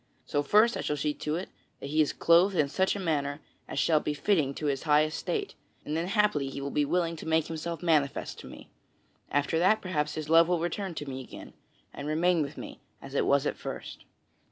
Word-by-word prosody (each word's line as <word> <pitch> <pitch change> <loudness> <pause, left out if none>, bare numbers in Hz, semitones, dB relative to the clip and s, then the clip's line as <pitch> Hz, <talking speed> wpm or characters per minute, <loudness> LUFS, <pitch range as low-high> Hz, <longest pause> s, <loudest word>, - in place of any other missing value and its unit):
So 145 - 0
first 215 +10 +4
I - - -3
shall 150 - -2
see 150 +1 -1
to 150 +1 -3
it 180 +3 -4 0.3
that 140 - -7
he 155 +1 +3
is 150 - +2
clothed 175 +4 +4
in 145 -4 +2
such 190 +7 +1
a - - -4
manner 145 -5 -1 0.3
as - - -6
shall 155 -2 +3
be 150 0 -3
fitting 145 -3 +1
to 155 - -5
his 140 -2 0
high 150 -1 +4
estate, 395 - -3 0.3
and 150 - -3
then 165 +2 -1
haply 200 -9 +1
he 135 - -6
will 140 0 -4
be 150 - +1
willing 170 +2 0
to 155 - -8
make 160 -1 +2
himself 165 +1 -5
manifest 150 -5 0
to - - -10
me. - - -12 0.6
After 145 +3 +1
that, 200 +5 +4
perhaps 150 -5 -2
his 155 -1 -4
love 165 +1 +6
will 175 -1 +1
return 175 +2 -3
to 150 - -5
me 130 -1 -5
again, 130 - -11 0.4
and 140 - -6
remain 165 +2 +2
with 145 0 -4
me - - -8 0.2
as 135 - -11
it - - +1
was 140 0 +3
at - - -1
first." - - -7
155 Hz, 225 wpm, -29 LUFS, 145-175 Hz, 0.6 s, love